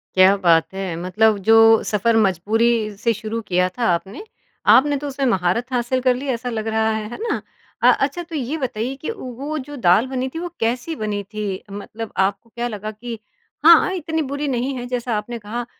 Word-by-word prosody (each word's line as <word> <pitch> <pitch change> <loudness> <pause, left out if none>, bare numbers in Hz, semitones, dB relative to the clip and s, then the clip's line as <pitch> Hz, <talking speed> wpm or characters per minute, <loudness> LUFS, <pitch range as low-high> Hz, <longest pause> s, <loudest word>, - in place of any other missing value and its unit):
क्या 185 +1 +6
बात 165 +1 +3
है! 190 -3 -4
मतलब 205 +5 +2
जो 225 0 +6 0.3
सफर 225 +2 +1
मजबूरी 215 +3 +2 0.3
से 230 +2 +1
शुरू 220 +1 -4
किया 180 0 +2
था 240 - 0
आपने। 195 - -5 0.5
आपने 290 +1 +4
तो 290 +1 -5
उसमें 275 0 -2
महारत 230 +4 0
हासिल 250 +1 0
कर 255 -1 +3
ली 275 +3 -6
ऐसा 245 +1 -4
लग 220 -1 -3
रहा 220 0 +1
है, 215 0 -3
है - - -6
ना? 460 -2 -1 0.4
अ, - - +7
अच्छा 285 +6 -1
तो 330 -1 -9
ये 285 +3 -2
बताइए 255 -1 -3
कि 315 - -3
वो 275 +5 -5
जो 290 - -8
दाल 215 +4 +4
बनी 260 0 -2
थी - - -2
वो 350 0 -4
कैसी 250 +8 -1
बनी 205 -1 -2
थी? 205 -2 -5
मतलब 215 +2 -7
आपको 200 +4 -8
क्या 240 +2 -3
लगा 215 -1 -5
कि 230 +1 -8 0.5
हाँ, 335 0 +11
हाँ, 375 - -1
इतनी 320 -2 -2
बुरी 285 +1 -2
नहीं 260 +1 -1
है 245 - -5
जैसा 245 -3 -2
आपने 235 +3 -5
कहा। 230 +3 -5
230 Hz, 205 wpm, -21 LUFS, 210-260 Hz, 0.5 s, हाँ